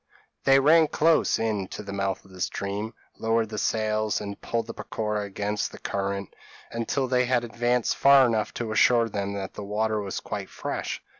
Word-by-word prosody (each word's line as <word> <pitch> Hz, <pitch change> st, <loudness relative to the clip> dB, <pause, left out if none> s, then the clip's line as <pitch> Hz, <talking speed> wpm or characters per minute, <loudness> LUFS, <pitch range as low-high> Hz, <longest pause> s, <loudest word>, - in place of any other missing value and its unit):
p> -, -, -51 dB, 0.4 s
They 135 Hz, 0 st, +6 dB
ran 155 Hz, +3 st, +6 dB
close 160 Hz, +2 st, +3 dB
in 105 Hz, -4 st, -1 dB
to 105 Hz, -, -7 dB
the 100 Hz, -1 st, -7 dB
mouth 95 Hz, -1 st, -2 dB
of 95 Hz, -, -17 dB
the 90 Hz, -1 st, -10 dB
stream, 100 Hz, +5 st, -3 dB, 0.2 s
lowered 115 Hz, 0 st, +1 dB
the 105 Hz, -1 st, -4 dB
sails, 110 Hz, -1 st, 0 dB
and 100 Hz, -1 st, -7 dB
pulled 115 Hz, -1 st, -2 dB
the 115 Hz, -, -7 dB
peroqua 105 Hz, -1 st, -3 dB
against 100 Hz, +1 st, -2 dB
the -, -, -10 dB
current, 100 Hz, 0 st, -3 dB, 0.4 s
until 115 Hz, +3 st, -1 dB
they 125 Hz, 0 st, +2 dB
had 120 Hz, -1 st, +1 dB
advanced 120 Hz, +1 st, 0 dB
far 140 Hz, -1 st, +7 dB
enough 110 Hz, -3 st, 0 dB
to 115 Hz, -2 st, -3 dB
assure 115 Hz, +1 st, +4 dB
them 100 Hz, -1 st, -3 dB
that 100 Hz, -1 st, -5 dB
the 105 Hz, -, -7 dB
water 105 Hz, +1 st, 0 dB
was 100 Hz, -2 st, -4 dB
quite -, -, -5 dB
fresh. -, -, -4 dB
110 Hz, 195 wpm, -26 LUFS, 100-120 Hz, 0.4 s, far